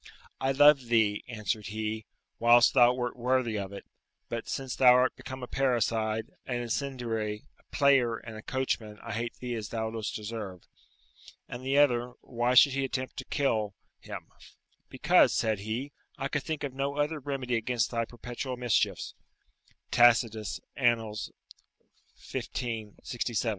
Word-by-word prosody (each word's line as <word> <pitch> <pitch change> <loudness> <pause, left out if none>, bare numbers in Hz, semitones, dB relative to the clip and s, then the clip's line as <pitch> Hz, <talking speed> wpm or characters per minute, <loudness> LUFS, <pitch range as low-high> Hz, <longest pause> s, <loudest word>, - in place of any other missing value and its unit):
"I 135 - +1
loved 140 -2 +6
thee," 110 -3 +2
answered 110 -2 -3
he, 110 0 -4 0.3
"whilst 120 +1 +6
thou 125 -2 +7
wert 125 -1 -3
worthy 125 -2 0
of 100 -1 -5
it, 100 - -9 0.4
but 115 -1 -4
since 135 -2 -3
thou 125 -2 +7
art 125 0 +3
become 130 -1 -8
a - - -5
parricide, 115 -4 0 0.2
an 125 - -2
incendiary, 120 -3 -3 0.2
a - - -27
player, 135 -5 +3
and 110 0 -10
a 110 - -8
coachman, 110 -4 -2
I - - -5
hate 115 +2 -3
thee 125 -1 -5
as 110 -3 -4
thou 110 -1 -2
dost 110 -2 -4
deserve." 105 -4 -6 0.8
And 125 +1 -7
the 135 +2 +1
other, 125 -4 +3
why 120 +1 0
he 135 +2 +8
should 135 +1 -1
attempt 130 0 -3
to - - -5
kill 110 -8 0 0.2
him? - - -9 0.6
"Because," - - +4
said 110 -2 +1
he, 115 +7 -4 0.3
"I 135 -1 -3
could 145 - -1
think 155 +1 -4
of 140 -3 -3
no 140 +1 -2
other 150 +1 0
remedy 135 -3 -3
against 115 +1 0
thy 115 -1 0
perpetual 120 +2 -6
mischiefs." 120 -2 0 0.8
[Tacitus, 115 -3 +3 0.2
Annal., 115 -4 +1 1.0
xv. 110 -4 -5
67. 120 -1 -1
120 Hz, 155 wpm, -29 LUFS, 110-130 Hz, 1.0 s, he